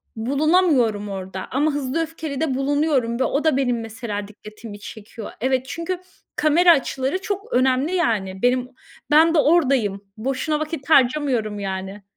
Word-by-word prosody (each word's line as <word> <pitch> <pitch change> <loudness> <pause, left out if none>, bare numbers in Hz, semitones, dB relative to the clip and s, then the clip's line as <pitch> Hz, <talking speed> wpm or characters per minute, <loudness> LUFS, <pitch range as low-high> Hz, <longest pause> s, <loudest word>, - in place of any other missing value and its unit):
bulunamıyorum 265 - +2
orada 190 -1 -6
ama 295 +4 +1
Hızlı 285 +2 -2
Öfkeli'de 315 -3 -3
bulunuyorum 275 -4 0
ve - - +3
o 280 +3 0
da 315 -4 +2
benim 245 -3 0
mesela 220 -2 -5
dikkatimi 215 0 -11
çekiyor. 215 +1 -9
Evet, 260 0 +1
çünkü 335 +3 -4 0.4
kamera 335 +4 +5
açıları 275 +4 0
çok 405 +3 -5
önemli 265 +7 +2
yani, 195 - -1
benim, 250 0 +1 0.4
ben 320 +2 +6
de 315 - +4
oradayım 270 - +2 0.2
boşuna 270 +6 -1
vakit 310 -2 -5
harcamıyorum 250 -7 +2
yani. 195 +1 -5
260 Hz, 140 wpm, -22 LUFS, 220-310 Hz, 0.4 s, ben